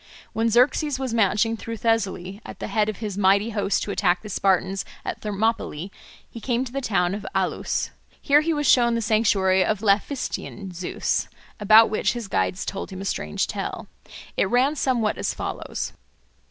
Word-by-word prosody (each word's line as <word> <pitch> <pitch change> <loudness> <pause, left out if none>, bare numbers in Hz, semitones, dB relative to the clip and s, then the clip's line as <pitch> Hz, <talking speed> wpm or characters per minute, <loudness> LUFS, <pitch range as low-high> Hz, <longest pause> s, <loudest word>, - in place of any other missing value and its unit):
When 225 +1 +1
Xerxes 260 +5 +3
was 260 -3 -3
marching 225 +1 +2
through 230 0 -6
Thessaly 200 -3 -1
at - - -9
the - - -5
head 215 -1 +1
of 215 - -4
his 205 -3 -4
mighty 200 +3 +3
host 205 -2 0
to 205 - -4
attack 180 -3 +1
the 210 - -8
Spartans 190 0 +1 0.2
at - - -4
Thermopylae, 205 -4 -2 0.4
he 230 - -10
came 245 +1 0
to 245 - -8
the 275 +1 -3
town 185 -7 +1
of 205 +1 -5
Alus. - - -1 0.3
Here 290 +1 +4
he 330 +2 0
was 295 -2 -1
shown 235 -2 +5
the 230 - -1
sanctuary 205 -4 +3
of 210 +1 -1
Laphystian 200 -2 -1
Zeus, 175 +1 -2 0.3
about 215 +2 +7
which 215 - +1
his 240 -4 -5
guides 190 -1 -1
told 195 - -5
him 190 - -8
a - - -5
strange 75 - -1
tale. - - -5 0.5
It 190 - +1
ran 260 +6 +3
somewhat 240 -7 0
as - - -1
follows. - - -4
215 Hz, 180 wpm, -24 LUFS, 195-235 Hz, 0.5 s, about